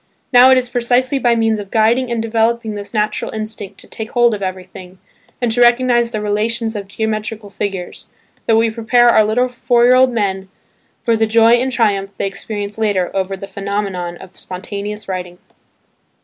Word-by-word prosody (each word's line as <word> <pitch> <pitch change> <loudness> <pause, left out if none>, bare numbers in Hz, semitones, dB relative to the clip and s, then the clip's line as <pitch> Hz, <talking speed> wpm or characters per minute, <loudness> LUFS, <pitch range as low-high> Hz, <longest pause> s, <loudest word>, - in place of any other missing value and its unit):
Now, 250 +1 +8
it 260 - +6
is 255 -1 0
precisely 250 +3 0
by 240 -2 +2
means 225 -1 +1
of 200 -1 -8
guiding 230 +4 +2
and 235 -1 -1
developing 225 0 0
this 205 -1 -7
natural 215 -1 -1
instinct 215 -2 -6
"to - - -16
take 220 +1 -7
hold 240 -2 +4
of 205 - -4
everything," 185 -1 -7 0.4
and 240 -2 0
to 245 +2 0
recognise 240 0 +4
the 220 -2 -4
relations 220 +2 -1
of 200 -2 -5
geometrical 215 0 -4
figures, 195 -2 -5 0.4
that 225 - +4
we 225 0 +2
prepare 240 +2 +3
our 215 - +5
little 230 +4 +1
four 245 -1 +1
year 250 +1 +6
old 255 0 +4
men 195 -4 -2 0.5
for 230 -2 +2
the 220 0 +1
joy 225 +1 +4
and 245 +2 +3
triumph 205 -5 +1
they - - -1
experience 205 +1 -5
later 200 -5 0
over 195 0 -2
the 195 - -8
phenomenon 195 -3 -4
of 185 0 -14
spontaneous 205 +3 -7
writing. 180 -2 -5
220 Hz, 180 wpm, -17 LUFS, 200-235 Hz, 0.5 s, Now